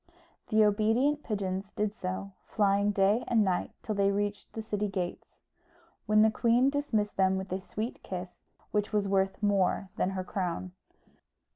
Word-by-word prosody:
The 215 0 +4
obedient 225 +8 +2
pigeons 195 -3 -3
did 210 0 -1
so, 190 -1 -4 0.2
flying 200 -1 +2
day 205 +3 +3
and 225 -3 +3
night 185 -3 0
till 215 - -2
they 200 -1 +2
reached 205 +1 -2
the 220 - -5
city 210 -1 -1
gates; 185 -3 -4 0.7
when 215 0 +5
the 220 - +4
queen 240 +4 +3
dismissed 250 -8 -1
them 190 0 +3
with 190 0 -5
a 190 +1 -2
sweet 215 +5 -5
kiss, 180 -1 -7 0.2
which 210 0 0
was 205 -2 +1
worth 195 +1 0
more 195 -1 +2
than - - +1
her 185 - -2
crown. 185 -1 -3
205 Hz, 160 wpm, -30 LUFS, 190-215 Hz, 0.7 s, when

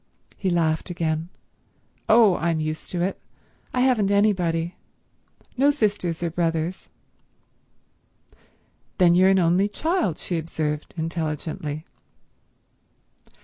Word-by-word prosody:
He 190 - -2
laughed 165 -1 0
again. 165 -1 -2 0.8
"Oh 220 -4 +6
I'm 165 -1 0
used 155 0 -4
to 175 -1 -1
it. 190 - -2 0.5
I 250 - 0
haven't 245 -6 +3
anybody. 180 -5 +1 0.8
No 275 +3 +4
sisters 205 - 0
or 170 - -1
brothers." 165 +1 -2 2.1
"Then 175 -3 +5
you're 185 +2 +5
an 195 - +4
only 180 +3 +3
child," 315 - -1
she 175 -2 -3
observed 150 -2 -4
intelligently. 155 -1 -4
175 Hz, 105 wpm, -24 LUFS, 160-195 Hz, 2.1 s, Oh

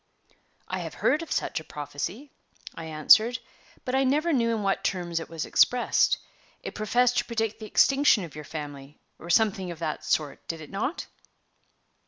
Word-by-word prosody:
"I - - -3
have - - -6
heard 305 - +2
of 330 - -8
such - - -1
a - - -11
prophecy," 150 - -6 0.4
I 165 - -8
answered, 190 +10 +5 0.5
"but 255 - -3
I 265 +1 +3
never 300 +6 +2
knew 235 -4 +2
in 225 -2 -1
what 195 -1 0
terms 175 -3 -1
it 165 - -8
was 165 -1 -4
expressed. 245 -1 +3 0.5
It - - -6
professed 245 +4 +2
to - - -1
predict 225 -2 -2
the 215 - -7
extinction 275 -4 +4
of 165 - -9
your 150 - -8
family, 145 -2 -8 0.2
or 170 - -10
something 195 -1 +2
of 170 - -6
that 155 -1 -4
sort, 150 -3 -1
did 165 - -4
it 155 - -11
not?" 220 - -3
200 Hz, 180 wpm, -27 LUFS, 160-245 Hz, 0.5 s, answered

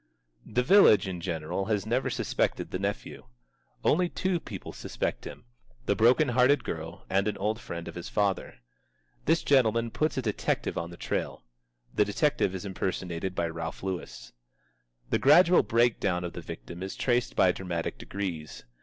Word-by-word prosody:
The 120 +3 +1
village 140 - +6
in 90 -2 -5
general 85 +2 -3
has 105 -1 0
never 120 +4 0
suspected - - -1
the 90 - -2
nephew. 100 -10 -4 0.6
Only 175 +3 +3
two 185 -1 -1
people 100 - -8
suspect - - -4
him: - - -9 0.4
the - - +2
broken 125 +6 +4
hearted 125 +2 +4
girl 80 +2 -6
and 100 +2 +1
an 105 - -1
old 105 +3 -1
friend 85 0 -6
of - - -6
his 85 0 -7
father. 100 -2 0 0.7
This 165 - +2
gentleman 115 -4 +3
puts 155 +2 -1
a 130 - 0
detective 105 -3 -1
on 85 0 -3
the 85 - -11
trail. - - -3 0.5
(The - - +4
detective 105 -1 +1
is 95 - -6
impersonated 95 -1 -3
by 85 - 0
Ralph 80 +1 -6
Lewis.) 95 -2 -5 0.8
The - - +2
gradual 175 +6 +6
breakdown 110 -5 +1
of 85 - -5
the - - -6
victim 85 +9 -9
is 95 +1 -5
traced 120 -1 0
by 90 - +5
dramatic 90 -3 -4
degrees. 90 -6 -5
100 Hz, 165 wpm, -28 LUFS, 90-125 Hz, 0.8 s, village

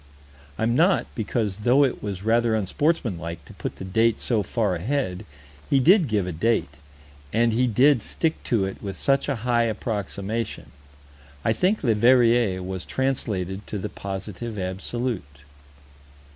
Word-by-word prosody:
I'm 115 +1 +1
not, 175 +7 +3
because, 110 -3 -2
though 125 +6 +4
it 130 - 0
was 100 -2 -5
rather 115 +1 +2
unsportsmanlike 95 - -1
to - - -13
put - - -5
the 95 - -8
date 110 +4 +2
so 115 -4 +1
far 105 0 0
ahead, 100 0 -2 0.4
he 140 - +4
did 175 - +5
give 105 -5 0
a 90 - -3
date, 90 -3 0 0.6
and 115 +1 +2
he 125 +3 +2
did 125 +3 +4
stick 160 +9 -2
to 110 -5 +1
it 95 - -6
with 100 -2 -5
such 140 +1 +1
a 140 - +1
high 120 -1 +3
approximation 110 0 -3 0.7
I 110 - +3
think 185 - +1
Leverrier 115 -4 +4
was 95 0 -5
translated 105 -8 -2
to 105 - -4
the 95 - -4
Positive 100 +3 -6
Absolute. 95 - -4
110 Hz, 145 wpm, -24 LUFS, 95-125 Hz, 0.7 s, did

